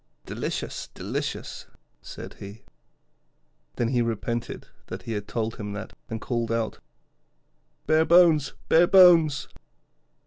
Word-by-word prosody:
'Delicious, -, -, -4 dB
delicious,' -, -, -5 dB, 0.3 s
said -, -, -9 dB
he. 100 Hz, +3 st, -10 dB, 1.1 s
Then 120 Hz, -1 st, 0 dB
he 125 Hz, -1 st, +1 dB
repented 115 Hz, 0 st, -3 dB, 0.2 s
that -, -, -7 dB
he 115 Hz, -, -6 dB
had 105 Hz, -2 st, -4 dB
told 115 Hz, -1 st, -3 dB
him 105 Hz, -1 st, -6 dB
that, 105 Hz, -, -7 dB, 0.2 s
and 115 Hz, -, -4 dB
called 120 Hz, 0 st, -2 dB
out: 115 Hz, -1 st, -2 dB, 1.1 s
'Bare 155 Hz, +1 st, +3 dB
bones, 165 Hz, -5 st, +4 dB
bare 170 Hz, +2 st, +5 dB
bones!' 170 Hz, -6 st, +6 dB
120 Hz, 115 wpm, -25 LUFS, 110-160 Hz, 1.1 s, bones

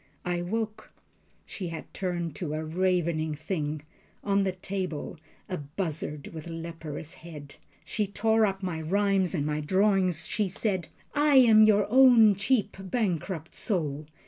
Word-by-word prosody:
I 175 Hz, -1 st, -1 dB
woke. 215 Hz, +4 st, -4 dB, 0.5 s
She 185 Hz, -, -6 dB
had 165 Hz, -1 st, -8 dB
turned 175 Hz, -4 st, -3 dB
to 155 Hz, -4 st, -3 dB
a 155 Hz, 0 st, -3 dB
ravening 170 Hz, -2 st, 0 dB
thing 150 Hz, -2 st, -3 dB, 0.4 s
On 200 Hz, -1 st, +2 dB
the 190 Hz, -1 st, 0 dB
table 185 Hz, -4 st, -5 dB, 0.3 s
a 185 Hz, -, -4 dB
buzzard 150 Hz, -1 st, -4 dB
with 160 Hz, 0 st, -8 dB
leperous 165 Hz, -2 st, -6 dB
head. 150 Hz, -4 st, -10 dB, 0.3 s
She 210 Hz, -2 st, -1 dB
tore 220 Hz, +2 st, +2 dB
up 195 Hz, -2 st, 0 dB
my 170 Hz, -4 st, -3 dB
rhymes 195 Hz, +2 st, +1 dB
and 145 Hz, -3 st, -1 dB
my 150 Hz, 0 st, -1 dB
drawings. 185 Hz, 0 st, +2 dB
She 210 Hz, -3 st, -1 dB
said: 185 Hz, -3 st, -1 dB, 0.3 s
"I 290 Hz, -1 st, +3 dB
am 225 Hz, -4 st, +8 dB
your 210 Hz, -1 st, +4 dB
own 240 Hz, -3 st, +7 dB
cheap 205 Hz, +3 st, 0 dB
bankrupt 185 Hz, -5 st, -2 dB
soul. 155 Hz, -, -2 dB
180 Hz, 145 wpm, -28 LUFS, 160-205 Hz, 0.5 s, am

